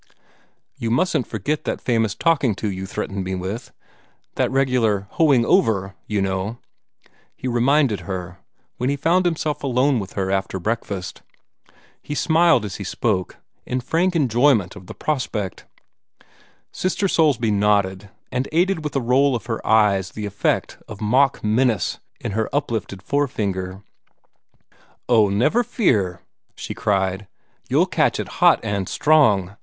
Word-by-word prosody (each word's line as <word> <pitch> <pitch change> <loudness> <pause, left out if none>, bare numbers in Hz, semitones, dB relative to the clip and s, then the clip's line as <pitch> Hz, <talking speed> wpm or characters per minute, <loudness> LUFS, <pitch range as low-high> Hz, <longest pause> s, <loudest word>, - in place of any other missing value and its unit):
"You 115 - -3
mustn't 125 +1 +1
forget 145 +9 -2
that - - -2
famous 115 -4 0
talking 145 - +2
to 105 +1 -3
you 95 0 -5
threatened 100 -1 -4
me 95 0 -3
with 105 +8 -5 0.6
that - - 0
'regular 125 -7 +1
hoeing 140 -7 +3
over,' 100 - +2
you 105 -2 0
know," 95 +4 -2 0.8
he - - -6
reminded 125 -1 +2
her, 90 -2 -6 0.4
when 125 - -1
he 140 - +1
found 175 +5 +2
himself 155 -3 -2
alone 130 0 +2
with 100 -2 -7
her 95 -1 -2
after 95 0 -1
breakfast. 100 -2 -4 0.8
He 150 - -5
smiled 160 -7 +3
as 100 - -6
he 100 - -6
spoke, 95 -1 -2 0.3
in 125 - -2
frank 170 +8 0
enjoyment 120 - +2
of 95 -3 -12
the - - -9
prospect. 115 - -3 1.0
Sister 190 +2 -1
Soulsby 140 - +2
nodded, 100 -1 +1 0.2
and 125 +2 -2
aided 175 +1 +1
with 150 - -4
a 135 - +1
roll 130 +3 +3
of 120 - -5
her 115 -2 -4
eyes 105 -3 +3
the 105 - -5
effect 100 0 -1
of 105 -2 -9
mock 130 +6 +2
menace 115 +2 +1 0.2
in 115 - -4
her 110 +2 -1
uplifted 115 -9 -3
forefinger. 100 -9 -2 1.2
"Oh, 110 -4 +4
never 120 - +2
fear," 105 - 0 0.3
she - - -6
cried. 95 -1 -1 0.4
"You'll - - +3
catch - - +1
it - - -3
hot - - +6
and 100 -2 -2
strong. 105 -12 +3
115 Hz, 145 wpm, -21 LUFS, 100-140 Hz, 1.2 s, hot